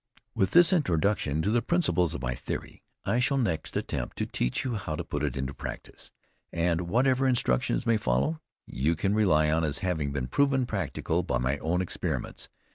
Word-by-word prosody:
With 95 - +1
this 175 +2 +6
introduction 90 - +1
to 105 - +1
the 120 +1 +2
principles 90 - +1
of - - -6
my 60 0 -1
theory, - - -6 0.2
I 120 - +1
shall 135 +3 +2
next 85 -11 -1
attempt - - -4
to - - -1
teach - - -2
you 125 - -1
how 95 -8 -3
to - - -4
put - - -4
it - - -2
into 65 +1 -3
practice, - - -8 0.4
and 85 0 0
whatever 130 +4 +3
instructions 65 - +1
may 115 -1 +3
follow, 105 - 0 0.2
you 75 +6 0
can 95 +5 0
rely 80 -8 +3
on 80 +1 +1
as 75 -2 0
having 80 -6 -1
been 70 -3 -2
proven 135 - +2
practical 95 - -2
by - - -1
my 65 +3 -1
own 85 +4 0
experiments. 90 - -4
90 Hz, 190 wpm, -28 LUFS, 70-120 Hz, 0.4 s, this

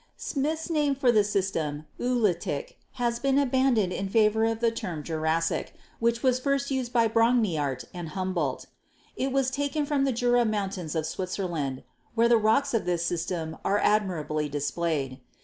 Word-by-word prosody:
Smith's 310 +3 -2
name 295 -3 +2
for 260 -2 +3
the 215 -3 +4
system, 165 -7 -1
"Oolitic," 245 - -1
has 235 -1 -1
been 275 +1 +2
abandoned 260 -8 +2
in 195 0 -3
favor 220 +1 +3
of 225 0 0
the 230 -1 +2
term 170 -9 -5
Jurassic, 160 +1 -1 0.2
which 235 0 +1
was 255 -1 +3
first 275 +1 0
used 260 -3 -1
by 235 -2 +4
Brongniart 215 - +1
and 175 -3 -6
Humboldt. 175 -6 -2 0.5
It 265 +1 -1
was 265 -1 +1
taken 285 +2 -1
from 285 -2 +1
the 270 - +2
Jura 245 0 +3
Mountains 195 -7 -2
of 160 -1 0
Switzerland, 170 -6 -3 0.3
where 230 0 +4
the 235 0 +5
rocks 245 +6 +2
of 230 - +1
this 175 -1 0
system 165 -2 -3
are 200 - +2
admirably 160 -9 0
displayed. 145 -2 -2
215 Hz, 160 wpm, -27 LUFS, 170-250 Hz, 0.5 s, the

